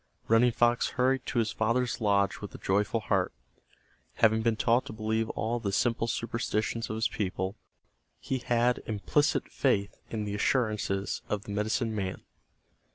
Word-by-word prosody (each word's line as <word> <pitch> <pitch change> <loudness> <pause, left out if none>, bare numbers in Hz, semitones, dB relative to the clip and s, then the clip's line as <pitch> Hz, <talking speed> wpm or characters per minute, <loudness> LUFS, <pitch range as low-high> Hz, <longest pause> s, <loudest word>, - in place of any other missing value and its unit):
Running 115 +2 +5
Fox 120 +1 +3
hurried 130 +1 +2
to 130 - -2
his 110 -2 +2
father's 120 +3 0
lodge 100 -2 +2
with - - -7
a - - -6
joyful 105 +3 0
heart. 95 -4 +1 0.8
Having 110 0 +4
been 115 0 +2
taught 115 +3 +2
to - - -6
believe 110 +1 -1
all 115 +2 -1
the 100 -4 -2
simple 115 +2 +1
superstitions 115 -1 -2
of 110 - -2
his 110 +1 +1
people, 95 -1 -3 0.6
he 130 - -2
had 120 0 +1
implicit 110 +7 +1
faith 100 0 +1 0.2
in 110 -2 -3
the 100 - -3
assurances 105 -3 0
of 105 -1 -1
the - - -8
medicine 110 +3 0
man. 95 -3 -3
110 Hz, 160 wpm, -29 LUFS, 105-120 Hz, 0.8 s, Running